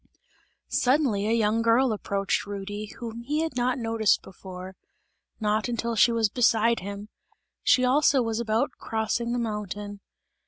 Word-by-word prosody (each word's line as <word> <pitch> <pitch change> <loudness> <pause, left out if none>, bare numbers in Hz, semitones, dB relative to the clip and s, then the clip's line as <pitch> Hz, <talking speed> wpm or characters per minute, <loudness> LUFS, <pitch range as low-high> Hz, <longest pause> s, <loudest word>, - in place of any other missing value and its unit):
Suddenly 250 -6 +2
a - - +1
young 225 0 +2
girl 230 +2 +3
approached 200 -1 -1
Rudy, 205 +1 -5
whom 235 -1 -6
he 295 +6 -1
had 320 -5 -4
not 250 +1 +1
noticed 225 -3 +1
before; 185 0 -10 0.6
not 215 0 0
until 235 -1 -2
she 225 +2 +5
was 230 -1 +2
beside 230 0 +2
him; 200 +2 -7 0.5
she 255 - +4
also 270 0 +4
was 225 -1 -2
about 225 0 0
crossing 225 +2 -2
the 245 - 0
mountain. 210 -3 -4
225 Hz, 145 wpm, -26 LUFS, 210-240 Hz, 0.6 s, she